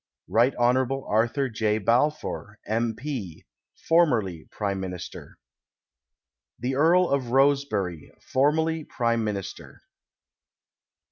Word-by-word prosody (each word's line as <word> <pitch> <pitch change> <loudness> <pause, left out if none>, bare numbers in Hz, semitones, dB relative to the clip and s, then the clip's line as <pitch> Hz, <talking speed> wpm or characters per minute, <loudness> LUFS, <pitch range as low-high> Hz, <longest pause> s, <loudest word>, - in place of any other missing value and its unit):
Rt. 120 +4 +3
Hon. 130 +2 +1
Arthur 120 +6 +1
J. 110 -2 0
Balfour, 115 -1 0
M. 115 +1 -1
P., 120 - -6 0.4
formerly 120 - +2
Prime 100 -2 -3
]\Iinist.'r. 90 -2 -7 1.2
The 130 +2 -2
Earl 170 +5 +4
of 135 -5 -1
Rosebery, 130 - +1
formerly 160 +4 +1
Prime 115 -4 -1
Min 105 -2 -1
ister. 95 - -9
120 Hz, 95 wpm, -26 LUFS, 105-140 Hz, 1.2 s, Earl